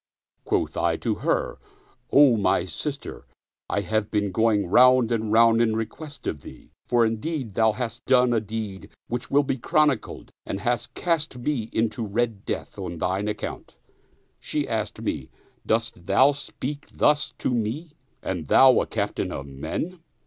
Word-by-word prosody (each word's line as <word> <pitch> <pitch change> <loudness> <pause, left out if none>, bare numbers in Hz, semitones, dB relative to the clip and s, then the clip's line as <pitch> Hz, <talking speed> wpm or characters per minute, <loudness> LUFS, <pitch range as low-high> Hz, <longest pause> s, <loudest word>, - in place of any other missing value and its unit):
Quoth - - 0
I - - +1
to - - -1
her, - - 0 0.3
" 405 -1 -36
O 140 -4 +7
my 100 -4 +2
sister, 140 - -6 0.4
I - - 0
have 110 -1 -1
been 105 -2 0
going 110 +1 +2
round 125 +4 +5
and 110 -2 -1
round 115 +1 +5
in 110 -2 +2
request 140 +7 -6
of 75 - -3
thee, - - -13 0.2
for 120 -1 +4
indeed 115 +1 -3
thou 110 +1 +3
hast 120 -2 -5
done 125 -2 +4
a 115 - +3
deed 105 -2 -6 0.2
which 120 +1 -4
will 145 +1 +4
be 135 -1 -2
chronicled 150 -3 0
and 95 - -4
hast 120 0 -2
cast 160 -6 -1
me 120 -3 -2
into 115 +1 -1
red 110 0 -2
death - - -5
on 90 -3 -5
thine 95 +5 -1
account." 105 - -5 0.6
She - - -2
asked - - -3
me, - - -3 0.2
" - - -34
Dost 115 -6 -1
thou 130 +9 +5
speak 145 0 -6
thus 150 -1 +2
to - - -1
me 125 +8 -2 0.3
and 85 -5 -3
thou 130 - +6
a - - -3
captain - - -2
of 70 - -5
men 110 - -5
115 Hz, 165 wpm, -25 LUFS, 105-135 Hz, 0.6 s, O